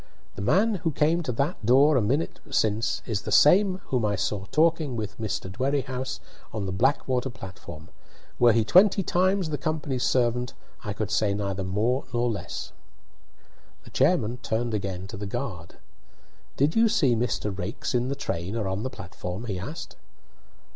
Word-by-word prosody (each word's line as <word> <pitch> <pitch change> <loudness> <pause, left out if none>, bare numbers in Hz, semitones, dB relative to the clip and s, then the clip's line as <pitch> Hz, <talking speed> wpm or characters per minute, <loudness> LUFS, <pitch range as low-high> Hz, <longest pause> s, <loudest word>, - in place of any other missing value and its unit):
The - - -7
man 205 - +3
who 165 - +1
came 160 +4 +2
to 155 - -2
that 140 +4 -2
door 135 +7 +5
a 130 - +4
minute 135 +10 -1
since 110 -4 0
is 110 -4 -2
the - - -6
same 185 +4 +5
whom 125 -3 +1
I 105 -1 +1
saw 100 0 -2
talking 155 - +2
with 105 -2 -5
Mr. 110 -3 -3
Dwerrihouse 130 +4 -2 0.3
on 105 -3 -3
the 95 - -3
Blackwater 130 +4 +1
platform. 90 -7 -10 0.5
Were 120 -1 +7
he 115 -1 +2
twenty 195 - +5
times 185 -1 +1
the 145 - -2
company's 145 -5 -2
servant, 125 -1 +1 0.3
I 105 - -3
could 105 0 -3
say 105 -1 +2
neither 100 -1 -2
more 110 +8 0
nor 120 0 +1
less." 105 - -6 1.1
The - - -14
chairman 115 +4 +2
turned 115 -1 -2
again 95 -3 -3
to 100 +3 -8
the 100 0 -5
guard. 100 - -5 0.8
"Did 145 +4 +2
you 225 0 +5
see 145 - +3
Mr. 110 -3 -1
Raikes 95 +5 -4
in 125 0 +1
the 140 - -2
train 95 -7 -3
or 110 -4 -1
on 95 +2 -2
the 130 - -2
platform?" 90 +1 -7
he 100 -5 -3
asked. 145 - -7
120 Hz, 170 wpm, -26 LUFS, 100-140 Hz, 1.1 s, Were